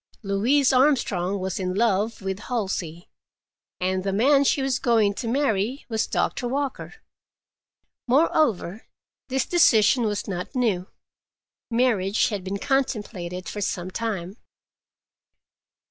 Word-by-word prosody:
Louise 245 Hz, +8 st, +2 dB
Armstrong 220 Hz, -9 st, +2 dB
was 190 Hz, 0 st, -3 dB
in 185 Hz, -1 st, -2 dB
love 215 Hz, 0 st, 0 dB
with 190 Hz, 0 st, -3 dB
Halsey, 190 Hz, -8 st, -4 dB, 0.7 s
and 185 Hz, 0 st, -1 dB
the 195 Hz, -, -1 dB
man 275 Hz, +8 st, +4 dB
she 275 Hz, 0 st, +1 dB
was 270 Hz, -1 st, 0 dB
going 225 Hz, -5 st, +2 dB
to 230 Hz, -, -5 dB
marry 245 Hz, -1 st, 0 dB
was 220 Hz, -1 st, -1 dB
Doctor 245 Hz, -, -1 dB
Walker. 275 Hz, -, -3 dB, 1.1 s
Moreover, 245 Hz, -, +1 dB, 0.4 s
this 260 Hz, -2 st, 0 dB
decision 230 Hz, -8 st, +4 dB
was 205 Hz, -1 st, -2 dB
not 180 Hz, +6 st, -5 dB
new; 205 Hz, -8 st, 0 dB, 0.8 s
marriage 230 Hz, -5 st, +2 dB
had 205 Hz, -4 st, -4 dB
been 195 Hz, +2 st, -3 dB
contemplated 205 Hz, -9 st, -2 dB
for 210 Hz, -, -5 dB
some 185 Hz, -1 st, -3 dB
time. 200 Hz, -3 st, -4 dB
215 Hz, 115 wpm, -24 LUFS, 190-255 Hz, 1.1 s, man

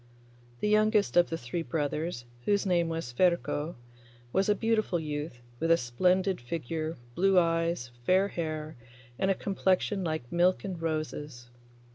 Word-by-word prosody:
The -, -, +1 dB
youngest 215 Hz, 0 st, +3 dB
of 175 Hz, 0 st, +5 dB
the 165 Hz, -, -2 dB
three 125 Hz, +6 st, -4 dB
brothers, 155 Hz, -4 st, -2 dB, 0.2 s
whose 205 Hz, 0 st, +2 dB
name 175 Hz, -3 st, +2 dB
was 165 Hz, -6 st, -3 dB
Ferko, 170 Hz, 0 st, +1 dB, 0.6 s
was 195 Hz, +2 st, +2 dB
a 210 Hz, -, +4 dB
beautiful 215 Hz, -4 st, +1 dB
youth, 150 Hz, -4 st, -5 dB, 0.2 s
with 165 Hz, -, 0 dB
a 165 Hz, -, +6 dB
splendid 180 Hz, +8 st, +1 dB
figure, 160 Hz, +4 st, -4 dB, 0.2 s
blue 195 Hz, +5 st, +3 dB
eyes, 165 Hz, -6 st, +1 dB
fair 190 Hz, +7 st, +3 dB
hair, 155 Hz, -3 st, -4 dB, 0.4 s
and 190 Hz, -, +2 dB
a 195 Hz, -, +3 dB
complexion 195 Hz, 0 st, 0 dB
like 155 Hz, -7 st, -3 dB
milk 175 Hz, +2 st, +3 dB
and 185 Hz, -4 st, -5 dB
roses. 150 Hz, -6 st, -4 dB
170 Hz, 145 wpm, -29 LUFS, 155-190 Hz, 0.6 s, a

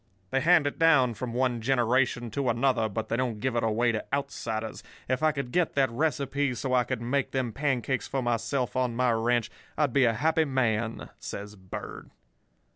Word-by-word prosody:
They 135 Hz, -, +1 dB
hand 165 Hz, 0 st, +5 dB
it 145 Hz, -, -2 dB
down 140 Hz, -7 st, +5 dB
from 120 Hz, +2 st, -5 dB
one 125 Hz, -1 st, 0 dB
generation 120 Hz, -1 st, +1 dB
to 135 Hz, +2 st, -1 dB
another, 120 Hz, -1 st, +1 dB
but 110 Hz, +1 st, -4 dB
they 115 Hz, -, -1 dB
don't 120 Hz, -3 st, -1 dB
give 130 Hz, +2 st, -1 dB
it 120 Hz, -, +2 dB
away 115 Hz, +2 st, +2 dB
to 110 Hz, -2 st, -2 dB
outsiders. 115 Hz, -6 st, -3 dB, 0.3 s
If 130 Hz, +3 st, 0 dB
I 155 Hz, 0 st, +4 dB
could 140 Hz, -4 st, -5 dB
get 180 Hz, +1 st, +1 dB
that 135 Hz, -3 st, +2 dB
recipe, 140 Hz, -1 st, 0 dB
so 130 Hz, +1 st, -2 dB
I 125 Hz, -1 st, +3 dB
could 115 Hz, -, -3 dB
make 135 Hz, +3 st, -1 dB
them 130 Hz, -4 st, -1 dB
pancakes 130 Hz, -3 st, -1 dB
for 135 Hz, -2 st, -2 dB
myself 120 Hz, +1 st, -1 dB
on 125 Hz, -2 st, 0 dB
my 125 Hz, 0 st, +2 dB
ranch, 115 Hz, 0 st, +1 dB, 0.3 s
I'd 145 Hz, -5 st, +1 dB
be 135 Hz, -2 st, +5 dB
a 115 Hz, -, +3 dB
happy 160 Hz, +5 st, +2 dB
man,' 115 Hz, -5 st, -1 dB
says 105 Hz, +1 st, -7 dB
Bird. 95 Hz, -2 st, -8 dB
125 Hz, 195 wpm, -28 LUFS, 115-135 Hz, 0.3 s, hand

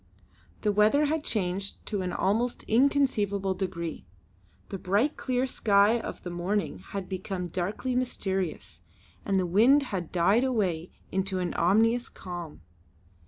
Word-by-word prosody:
The 210 Hz, -, +2 dB
weather 215 Hz, +9 st, +4 dB
had 310 Hz, +1 st, -1 dB
changed 195 Hz, -4 st, -2 dB
to 205 Hz, -2 st, -2 dB
an 180 Hz, -1 st, -2 dB
almost 225 Hz, +7 st, 0 dB
inconceivable 220 Hz, -7 st, +2 dB
degree. 170 Hz, -, -4 dB, 0.6 s
The 195 Hz, -, -5 dB
bright 205 Hz, +12 st, +1 dB
clear 255 Hz, 0 st, 0 dB
sky 215 Hz, -2 st, +3 dB
of -, -, -7 dB
the 175 Hz, -, -5 dB
morning 175 Hz, -, -2 dB
had 190 Hz, -, -6 dB
become 185 Hz, -1 st, -4 dB
darkly 200 Hz, +9 st, -2 dB
mysterious, 190 Hz, -, -2 dB, 0.4 s
and 195 Hz, -1 st, +2 dB
the 185 Hz, -, +1 dB
wind 235 Hz, +11 st, +5 dB
had 190 Hz, -10 st, -4 dB
died 195 Hz, +7 st, +3 dB
away 190 Hz, -10 st, 0 dB, 0.2 s
to 190 Hz, 0 st, -1 dB
an 180 Hz, -2 st, -2 dB
ominous 225 Hz, +7 st, +2 dB
calm. 175 Hz, -, -8 dB
195 Hz, 135 wpm, -28 LUFS, 180-230 Hz, 0.6 s, wind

